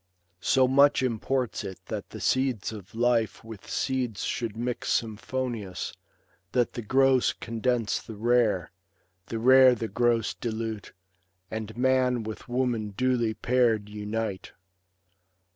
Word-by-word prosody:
So 130 +7 +3
much 140 +1 +5
imports 125 0 -1
it 95 -2 -6
that - - -5
the - - -8
seeds 130 -6 0
of 100 -2 -10
life 120 -1 +1
With 110 -3 -11
seeds 125 -5 -1
should 115 -3 -3
mix 120 +1 -2
symphonious, 115 -3 -2 0.6
that 125 -2 +1
the 120 - -4
gross 130 +2 +3
Condense 115 -1 -1
the 110 - -9
rare, 110 -6 +2 0.6
the 115 - -4
rare 130 +2 +7
the 115 -1 -3
gross 120 -1 +1
dilute. 110 -2 -4 0.6
And 110 0 -5
man 125 -1 +2
with 110 +3 -7
woman 120 -5 -1
duly 120 -3 +1
pair'd 115 -4 +1
unite. 105 -1 -4
115 Hz, 125 wpm, -27 LUFS, 110-125 Hz, 0.6 s, rare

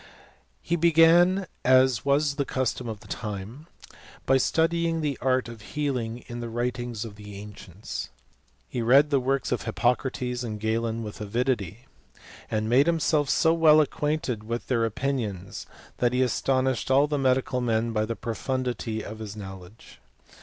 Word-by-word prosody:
He 170 - 0
began, 170 +3 +5 0.2
as 130 -2 +4
was 140 +1 +2
then. - - -18
the 140 - 0
custom 130 -2 -1
'of 110 -2 -6
the 110 - -15
time, 110 - -6 0.6
by 135 - +4
studying 165 +3 +1
the 145 -3 -1
art 130 -1 +1
of 115 -1 -9
liealing 125 -2 -3
in 120 0 -6
the 120 - -4
'writ^. 120 +2 -2
ings 120 -2 -4
of 105 -3 -10
the 105 -1 -10
ancients. 105 -2 -8 0.6
He 120 - -3
read 135 +6 +5
the 140 - +4
works 135 +1 -1
of. 125 - 0
Hippo 120 +1 +2
crates 125 -2 -4
and 110 -3 -5
Galen 115 +1 -1
with 105 0 -8
avidity; 115 -1 -2 0.6
and 110 0 -1
made 130 +6 +4
himself 155 -3 +2
'A^ 165 0 +3
well 155 -2 +6
acquainted 150 -6 -1
with 115 +2 -4
their 115 -3 +2
opinions, 110 -6 -3 0.3
that 120 0 +1
he 125 - +2
astonishtft 130 0 0
all 135 +2 +5
the 150 -1 -1
medical 130 -1 +1
men 115 -1 0
by 110 -1 0
the 115 +1 -3
profundity 115 0 -3
of 110 +1 -8
his 105 -1 -7
knoi^. 95 -2 -8
ledge. 90 +6 -16
125 Hz, 165 wpm, -26 LUFS, 110-140 Hz, 0.6 s, well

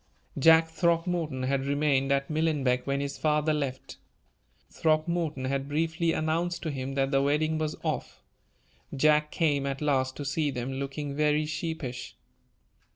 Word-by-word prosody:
Jack 160 +3 +6
Throckmorton 165 -4 0
had 135 +1 0
remained 140 -1 +1
at 140 0 +1
Millenbeck 145 -6 0
when 140 0 0
his 140 0 -4
father 150 0 +2
left. 140 -3 -4 0.7
Throckmorton 155 -3 0
had 135 +1 -2
briefly 165 +2 0
announced 165 +2 -1
to 160 - -2
him 135 -1 -4
that 135 0 +1
the 135 -1 +3
wedding 155 +3 +1
was 155 -1 -2
off. - - -3 0.8
Jack 150 +2 +3
came 145 -5 +1
at 135 0 -3
last 130 -3 0
to 145 - -6
see 145 +1 0
them, 130 0 -4
looking 140 +1 -4
very 150 +1 +2
sheepish. 155 -5 -5
150 Hz, 145 wpm, -28 LUFS, 135-160 Hz, 0.8 s, Jack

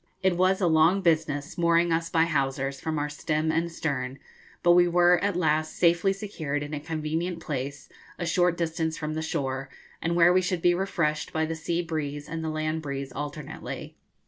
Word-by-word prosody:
It 190 -2 +3
was 185 +2 +3
a 190 - +2
long 165 +4 +4
business 155 -1 0
mooring 170 0 +3
us 165 0 0
by 165 -1 +3
hawsers, 135 -3 -1
from 160 -1 -2
our 145 0 0
stem 155 +1 -1
and 170 +1 0
stern, 135 -5 -3 0.5
but 175 - +6
we 175 0 +6
were 175 +1 +4
at 200 -2 +1
last 155 -2 +1
safely 175 +2 +3
secured 165 -8 -3
in 145 +1 -7
a 150 - -2
convenient 160 +3 -3
place, 140 -2 -5 0.3
a 175 - -3
short 175 0 +2
distance 160 -1 -1
from 155 -1 -3
the 160 - -2
shore, 135 -4 -3 0.3
and 170 +1 0
where 175 +1 +6
we 185 - +4
should 180 -1 -2
be 175 - +5
refreshed 170 -5 -1
by 160 0 0
the 160 - -3
sea 165 +2 -2
breeze 145 -3 -4
and 160 +1 -4
the 160 - -2
land 155 +1 -2
breeze 140 -2 -5
alternately. 145 +2 -6
160 Hz, 195 wpm, -27 LUFS, 150-175 Hz, 0.5 s, but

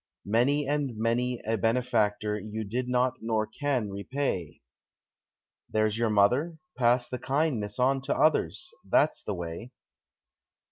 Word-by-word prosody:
Many 130 +7 +2
and 140 -5 -1
many 120 +2 0
a 110 +1 0
benefactor 110 -2 +1
you 110 +2 -5
did 125 +5 -3
not 125 0 +1
nor 110 -1 0
can 120 -1 -2
repay 100 - -3 1.1
There's 110 -1 +1
your 115 -1 +2
mother. 125 +11 +2 0.2
Pass 120 0 +3
the 125 - -5
kindness 135 -8 -1
on 135 +1 +2
to 140 - 0
others 260 - +1 0.2
that's 145 -5 +3
the 105 - -3
way. 85 +8 -6
120 Hz, 130 wpm, -28 LUFS, 105-135 Hz, 1.1 s, Pass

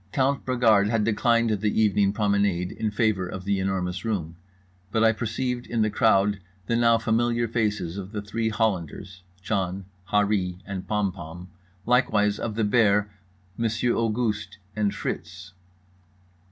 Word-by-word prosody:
Count 135 0 +1
Bragard 110 -5 +4
had 115 -1 +1
declined 115 +1 +2
the 105 +1 0
evening 105 -2 +3
promenade 100 -4 +1
in 110 -1 -2
favour 105 -3 0
of 95 +1 -6
The 100 -1 +1
Enormous 95 -2 -2
Room, 90 -8 -3 0.6
but 110 +1 +2
I 110 - +6
perceived 120 +3 -3
in 115 -2 0
the 110 - 0
crowd 100 -2 +3 0.3
the 115 - 0
now 115 -1 +4
familiar 115 +1 +1
faces 105 -6 -1
of 95 0 -7
the 105 -2 -4
three 110 +2 -2
Hollanders—John, 95 -1 -3 0.3
Harree 100 -3 +1
and 95 -2 -6
Pompom—likewise 95 +3 -1
of 110 -2 -3
The 115 - 0
Bear, 105 -2 +3 0.5
Monsieur 115 +1 0
Auguste, 110 -3 -1 0.2
and 105 -2 +1
Fritz. 90 +2 -6
105 Hz, 135 wpm, -25 LUFS, 95-115 Hz, 0.6 s, I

